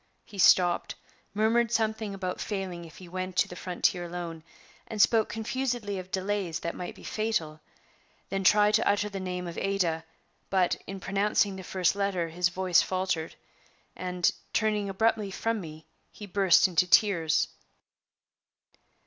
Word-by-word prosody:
He 200 - -11
stopped, 175 -1 +4 0.4
murmured 225 +2 +2
something 220 -2 -1
about 185 -2 -4
failing 185 -4 -4
if 160 - -14
he 185 - -11
went 185 +1 -5
to - - +4
the 180 - -9
frontier 180 0 0
alone, 170 -2 -6 0.5
and 220 - -6
spoke 220 +1 +4
confusedly 230 -3 -2
of 185 0 -9
delays 190 -3 -2
that 170 - -3
might 180 - -6
be - - -15
fatal, 210 -9 -2 0.7
then 195 0 -2
tried 210 +2 +5
to - - +3
utter 205 +1 +1
the 200 -1 -5
name 180 -1 -4
of 170 -1 -5
"Ada"; 180 -5 0 0.5
but, 185 -2 +2
in 195 0 -6
pronouncing 200 +1 +1
the 190 - -7
first 180 0 +1
letter, 195 -4 -1
his 175 +2 +1
voice 185 -1 +3
faltered, 185 -4 -2 0.6
and, 180 -1 0 0.2
turning 210 -2 +1
abruptly 215 +1 +1
from 225 +3 -2
me, 155 -2 -10 0.3
he 210 - -9
burst 195 -1 +4
into 180 0 +2
tears. 170 -6 +3
190 Hz, 150 wpm, -28 LUFS, 180-210 Hz, 0.7 s, tried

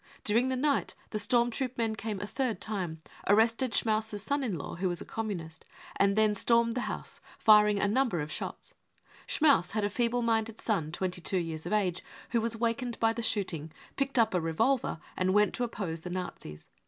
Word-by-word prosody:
During 235 +5 +3
the 260 - 0
night 280 +2 0 0.2
the 215 - 0
storm 240 +2 +3
troop 255 +1 -3
men 225 -2 0
cam§ 215 -2 -4
a 205 - -4
third 250 +1 -2
time, 180 -7 -4 0.2
arrested 225 +4 +3
Schmaus's 215 -2 +1
son 285 +3 0
in 210 -9 -2
law, 145 - -6
who 185 +1 0
was 175 -1 -2
a - - -8
Communist, 175 -8 -5 0.3
and 200 0 +3
then 215 -1 +4
stormed 230 +2 +3
the 245 0 -2
house, - - -6 0.2
firing 210 -1 +6
a 200 - +2
number 225 -4 +1
of 150 +1 -4
shots. - - -5 0.5
Schmaus 280 - +3
had 215 -1 0
a 205 - 0
feeble 240 +2 0
minded 225 -1 0
son 170 -9 -1
twenty 180 +1 -3
two 190 - 0
years 165 -3 -3
of - - -2
age 185 -4 0 0.3
who 235 -1 +2
was 230 0 0
wakened 235 +1 -1
by 225 0 +3
the 235 - -4
shooting, 185 -8 -1 0.2
picked 275 -1 -1
up 225 -3 +4
a 180 - +1
revolver 220 +5 0 0.2
and 185 +1 +1
went 210 0 +4
to 245 - -2
oppose 195 -8 -3
the 180 - -7
Nazis. 180 - -6
215 Hz, 205 wpm, -30 LUFS, 185-235 Hz, 0.5 s, firing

